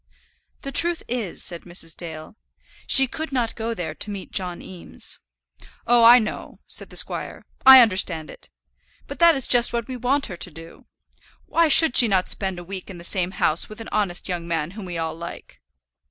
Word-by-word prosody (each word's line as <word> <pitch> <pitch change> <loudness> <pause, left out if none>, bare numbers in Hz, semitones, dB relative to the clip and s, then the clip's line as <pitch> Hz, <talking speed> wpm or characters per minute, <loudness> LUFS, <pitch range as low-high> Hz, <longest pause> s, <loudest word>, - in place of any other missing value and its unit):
"The 275 - -6
truth 340 +4 +3
is," 230 -7 -5
said 170 -2 -7
Mrs. 175 -2 -6
Dale, 160 +2 -8 0.5
"she 270 - +7
could 315 +5 -7
not 245 -4 -2
go 230 0 -5
there 160 -6 -5
to 205 - -7
meet 200 -2 -8
John 180 -2 -4
Eames." 180 -2 -7 0.7
"Oh, 240 0 +4
I 235 +2 +8
know," 215 -3 -5
said - - -3
the - - -13
squire: - - -3 0.2
"I 265 -1 +11
understand 185 -7 0
it. - - -13 0.6
But - - -10
that 340 -1 +6
is 270 - -1
just 240 -1 +3
what 235 -1 -3
we 260 - -6
want 260 +4 -1
her 180 - -9
to 180 - -3
do. 165 0 -15 0.6
Why 335 0 +2
should 305 -2 +6
she 240 - +8
not 190 -3 0
spend 190 -2 -3
a 175 - -8
week 190 +1 -8
in 185 - -9
the 170 - -12
same 180 0 0
house 155 +2 0
with 215 - -11
an 225 - -9
honest 195 -5 -1
young 175 -2 -5
man 165 -1 -3
whom 205 0 -9
we 175 -2 -6
all 160 -1 -3
like." 170 +1 -11
195 Hz, 200 wpm, -22 LUFS, 175-245 Hz, 0.7 s, I